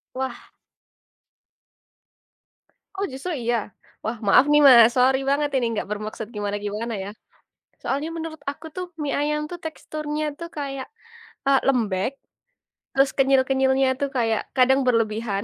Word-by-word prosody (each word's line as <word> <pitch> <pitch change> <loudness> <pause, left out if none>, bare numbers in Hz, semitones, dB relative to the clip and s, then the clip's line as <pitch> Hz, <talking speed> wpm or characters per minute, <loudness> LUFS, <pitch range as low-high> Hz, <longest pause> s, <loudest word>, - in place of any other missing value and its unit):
Wah. 265 0 -5 2.5
Oh 395 - 0
justru 270 +8 -5
iya? 240 0 +1 0.5
Wah 225 +1 -3
maaf 255 +7 +6
nih 295 - +6
Mas, 235 -2 +8
sorry 260 +1 +4
banget 290 +1 +1
ini 250 -3 +2
nggak 210 - -3
bermaksud 215 +1 -5
gimana-gimana 205 +2 -3
ya. 200 - -6 0.7
Soalnya 285 +4 -2
menurut 320 -1 -6
aku 315 +3 -14
tuh 365 - -3 0.2
mie 280 - -1
ayam 300 +1 0
tuh 350 - -6
teksturnya 310 -1 -4 0.2
tuh 335 0 -6
kayak, 275 -2 -4 0.6
eee, 275 -1 +5
lembek, 220 -5 +1 0.8
terus 270 0 +4
kenyal-kenyalnya 265 0 +3
tuh 280 - 0
kayak 225 -2 +1 0.2
kadang 265 +2 +5
berlebihan, 220 -3 0
265 Hz, 130 wpm, -23 LUFS, 225-290 Hz, 2.5 s, Mas